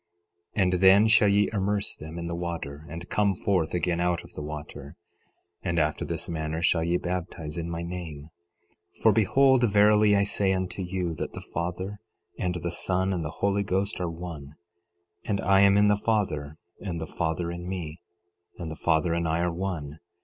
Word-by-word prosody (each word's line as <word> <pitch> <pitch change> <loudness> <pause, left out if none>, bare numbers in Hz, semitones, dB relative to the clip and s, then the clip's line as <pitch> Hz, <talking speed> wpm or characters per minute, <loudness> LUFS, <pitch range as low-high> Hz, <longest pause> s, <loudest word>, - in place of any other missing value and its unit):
11:26 100 - +4
And 90 0 +2
then 100 +3 +7
shall 110 -1 +5
ye 100 0 +4
immerse 100 0 0
them 80 +2 -9
in 85 - -4
the 85 - -3
water, 80 -4 -5
and 85 +2 -7
come 100 +1 +1
forth 90 -3 0
again 90 -1 0
out 90 -1 0
of - - -15
the - - -6
water. 75 -1 -7 0.7
11:27 90 - -2
And 85 - 0
after 75 0 0
this - - -3
manner 80 0 -3
shall 85 -2 +3
ye 85 +1 +1
baptize 85 -4 -4
in 85 0 -4
my 85 0 -4
name; 85 -4 -7 0.7
for - - +6
behold, 135 -2 +4
verily 105 0 +5
I 100 - +3
say 100 -1 +2
unto 95 +1 -3
you, 90 -2 -2
that - - -4
the - - -8
Father, 90 +4 -3 0.4
and 90 -1 -1
the 85 0 -3
Son, 95 +2 0
and 85 -3 -2
the 75 - -3
Holy 100 +5 0
Ghost 100 +1 -1
are 90 - -1
one; 80 -4 -8 0.7
and 100 -2 -1
I 95 +1 +4
am 100 0 +6
in 105 0 +5
the 105 - +4
Father, 85 -10 -1 0.2
and 90 -5 -4
the 80 - -4
Father 85 +2 -2
in 85 +1 -6
me, 85 -3 -5 0.6
and 85 -3 -5
the - - -5
Father 80 +1 +1
and 85 0 0
I 80 +1 0
are 90 -1 0
one. 85 -5 -4
90 Hz, 195 wpm, -27 LUFS, 80-100 Hz, 0.7 s, then